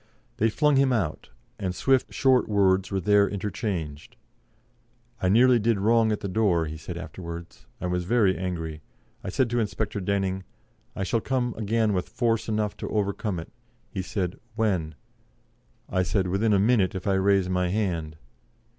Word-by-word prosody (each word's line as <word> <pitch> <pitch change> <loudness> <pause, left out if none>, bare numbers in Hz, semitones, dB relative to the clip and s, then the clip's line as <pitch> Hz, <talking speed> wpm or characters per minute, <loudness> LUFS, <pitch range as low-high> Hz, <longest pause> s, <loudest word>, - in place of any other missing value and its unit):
They 110 - +3
flung 150 +4 +2
him 135 -1 +4
out, 95 -11 -1 0.3
and 90 -2 -2
swift, 135 +4 +2
short 130 -4 +3
words 95 -2 +3
were 95 - -1
there 100 +2 +4
interchanged. 95 -7 -4 1.1
"I 90 - +2
nearly 120 +4 +5
did 115 0 +2
wrong 110 +2 +3
at 105 - -2
the 100 - -3
door," 95 -5 +2
he 80 0 -6
said 85 +2 -7
afterwards, 85 -5 -8
"I - - -4
was 90 0 -1
very 100 -2 +3
angry. 80 -4 -4 0.4
I 100 - -4
said 130 +6 +1
to 120 - +1
Inspector 110 -1 -2
Denning, 95 -1 -1 0.5
'I 95 - -2
shall 110 +5 0
come 125 -2 -1
again 110 0 +1
with 90 -2 -2
force 115 -2 0
enough 105 -1 -1
to - - -5
overcome 100 -1 -1
it,' 80 - -10 0.4
He 95 - -3
said, 90 -1 -3 0.2
'When?' 95 -9 0 0.9
I 95 - 0
said, 95 +1 0
'Within 100 +4 +1
a 100 - +4
minute 105 -2 +3
if 95 - -5
I 100 - +2
raise 95 -1 +3
my 90 0 0
hand.'" 85 -6 -2
100 Hz, 170 wpm, -26 LUFS, 90-110 Hz, 1.1 s, nearly